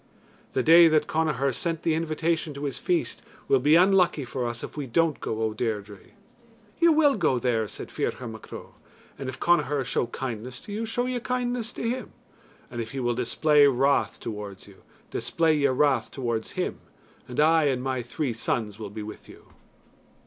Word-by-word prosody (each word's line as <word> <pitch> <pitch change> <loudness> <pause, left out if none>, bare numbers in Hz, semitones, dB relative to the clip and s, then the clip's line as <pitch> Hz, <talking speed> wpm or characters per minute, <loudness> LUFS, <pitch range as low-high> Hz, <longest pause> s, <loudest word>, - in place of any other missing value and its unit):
"The 130 - +1
day 165 +3 +8
that 155 -2 +3
Connachar 150 -4 0
sent 165 +4 -3
the 165 - +2
invitation 160 -1 -1
to 140 - -6
his 140 -2 -3
feast 175 -2 -1 0.3
will 135 - +4
be 150 +5 +4
unlucky 180 -5 +4
for 125 0 -3
us 120 0 -5
if - - -7
we 145 -3 -4
don't 160 +4 +1
go, 110 0 -3
O 110 -1 0
Deirdre." 105 -3 -3 0.8
"You 335 0 +6
will 300 -3 +4
go 135 - +2
there," 115 -3 0
said - - -8
Ferchar 125 - -3
Mac 110 -1 -10
Ro; - - -9 0.5
"and 135 -2 -4
if 130 - -8
Connachar 145 -5 +2
show 125 - -1
kindness 125 0 -5
to 205 - -8
you, 225 +2 -3
show 245 +2 -1
ye 250 -1 -2
kindness 245 -1 -2
to 230 - -3
him; 255 +2 -3 0.6
and 120 - -4
if 115 +2 -7
he 135 - -3
will 120 -1 0
display 145 +4 +4
wrath 135 +1 +2
towards 105 -3 -7
you 100 -2 -16 0.3
display 165 -2 +1
ye 145 -2 +3
wrath 135 +1 +2
towards 115 -4 -3
him, - - -3 0.5
and 125 +1 -5
I 160 +1 +5
and 130 -3 0
my 130 -1 -1
three 120 +2 -3
sons 110 -2 -2
will 105 -2 -6
be 105 +1 -7
with 105 - -10
you." - - -15
140 Hz, 190 wpm, -26 LUFS, 120-165 Hz, 0.8 s, day